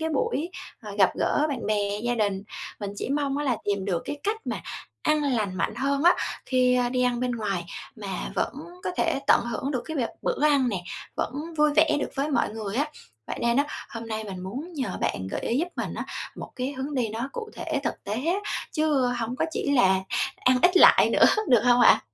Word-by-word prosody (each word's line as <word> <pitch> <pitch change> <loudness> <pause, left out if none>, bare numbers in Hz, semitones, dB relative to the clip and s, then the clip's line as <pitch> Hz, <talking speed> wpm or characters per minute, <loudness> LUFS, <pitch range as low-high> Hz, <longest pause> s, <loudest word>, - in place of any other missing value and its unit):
cái 320 - 0
buổi, 310 +2 -1 0.3
ờ, 210 - -7
gặp 190 - +6
gỡ 300 - +2
bạn 275 -4 -3
bè, 205 -1 0
gia 240 0 0
đình. 200 -3 0 0.4
Mình 200 -1 -3
chỉ - - -3
mong 280 -1 0
á 295 - -1
là 250 -5 +1
tìm 200 -1 +1
được 175 -4 -1
cái 290 - -4
cách 420 +2 0
mà - - -2 0.4
ăn 305 0 +2
lành 220 -9 0
mạnh 190 - -1
hơn 275 +3 0
á, 350 - +7 0.3
khi, 255 -1 +3
ơ, 245 -1 +2
đi 250 0 0
ăn 245 -1 +1
bên 250 0 0
ngoài 200 -6 -2 0.3
mà 205 -2 -7 0.3
vẫn - - 0 0.3
có - - 0
thể 330 -5 +1
tận - - +6
hưởng 250 +4 -2
được 250 -4 -1
cái 320 -1 -5
việc 235 -4 0
bữa 295 - 0
ăn 280 -4 +4
nè, 190 -5 -2 0.3
vẫn 310 +5 -3
vui 300 0 +4
vẻ 310 -1 +5
được - - -2
với 285 +2 -1
mọi 245 - +2
người 215 0 -5
á. 290 - +2 0.4
Vậy - - -5
nên 235 +1 +2
á, 285 +1 +3 0.2
hôm 230 0 -7
nay 220 -1 -3
mình 190 -3 -6
muốn 265 - -6
nhờ 280 -5 -3
bạn 95 - -1
gợi - - -2
ý 240 - 0
giúp 350 +3 0
mình - - -3
á - - -4 0.3
một - - -7
cái 255 +2 -2
hướng 275 +2 -4
đi 240 -4 +1
nó 230 +5 -4
cụ 440 -2 -6
thể - - -2
thực - - -3
tế 205 - -2
á, 350 - +2 0.4
chứ 300 -5 +2
hông 245 0 -2
có - - +1
chỉ 285 - -2
là 190 -8 +4 0.4
ăn 255 0 +3
ít 360 +1 +5
lại - - +7
nữa, - - +5 0.2
được 240 -4 +6
hông 245 0 +5
ạ? - - +7
250 Hz, 235 wpm, -26 LUFS, 220-290 Hz, 0.4 s, á